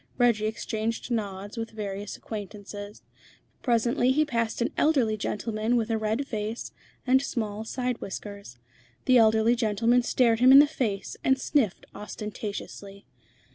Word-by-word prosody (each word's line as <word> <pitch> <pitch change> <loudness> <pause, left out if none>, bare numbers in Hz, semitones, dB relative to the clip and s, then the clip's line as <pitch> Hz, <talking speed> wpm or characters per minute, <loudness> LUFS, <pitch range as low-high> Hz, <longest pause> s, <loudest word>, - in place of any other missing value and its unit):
Reggie 235 -4 +3
exchanged 220 +2 -3
nods 205 -1 -3
with 225 0 -3
various 205 -2 -5
acquaintances. 205 -1 -8 0.6
Presently 240 +1 +2
he 305 +3 +3
passed 230 -5 -1
an 235 - 0
elderly 265 -8 +2
gentleman 215 +2 -1
with 230 -1 0
a 225 - +1
red 220 +5 -1
face 220 -2 -4 0.3
and 260 +1 +4
small 220 -5 -3
side 250 +1 -3
whiskers. 200 - -7 0.5
The 255 -1 +5
elderly 220 +1 +4
gentleman 230 +2 +2
stared 235 -2 +2
him 255 +2 +7
in 270 - +10
the 290 - +9
face, 220 -9 -3
and 265 0 +3
sniffed 265 - 0
ostentatiously. 205 -1 -7
220 Hz, 135 wpm, -27 LUFS, 210-245 Hz, 0.6 s, in